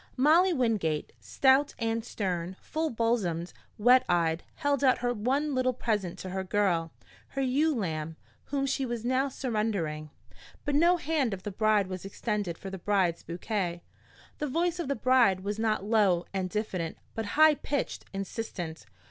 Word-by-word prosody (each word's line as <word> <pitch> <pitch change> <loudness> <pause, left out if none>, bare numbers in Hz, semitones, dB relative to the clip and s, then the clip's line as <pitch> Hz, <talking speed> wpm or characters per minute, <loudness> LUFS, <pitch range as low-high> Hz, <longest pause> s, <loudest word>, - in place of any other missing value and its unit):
Molly 325 +8 +5
Wingate, 215 - 0
stout 270 +2 +3
and 225 0 -1
stern, 185 -5 -3
full 315 0 -2
bosomed, 215 - -1 0.2
wet 250 +4 +6
eyed, 170 -1 +2
held 285 -2 0
out 255 -2 +5
her 245 0 0
one 270 +7 0
little 255 0 +1
present 205 -7 -1
to 185 0 -7
her 190 0 -2
girl, 180 -4 +1 0.4
her 275 - -4
ewe 290 +4 +2
lamb, 160 -7 -3 0.3
whom 275 -1 -1
she 270 0 0
was 240 -2 -3
now 260 +2 +1
surrendering. 210 - -2 0.6
But 290 - 0
no 340 +5 +5
hand 300 - 0
of 185 - -14
the 205 - -4
bride 215 0 +2
was 185 -1 -6
extended 200 -3 -3
for 195 - -8
the 190 - -6
bride's 185 -3 +1
bouquet. 175 -1 -3 0.6
The 300 - -1
voice 340 +5 0
of 340 - -2
the 280 - 0
bride 235 -6 +3
was 205 +2 -3
not 215 -3 +1
low 205 -5 +3
and 190 -1 -1
diffident, 185 -5 -3 0.2
but 225 - -3
high 310 0 +8
pitched, 285 -1 -3
insistent. 195 -4 -5
220 Hz, 165 wpm, -29 LUFS, 185-265 Hz, 0.6 s, high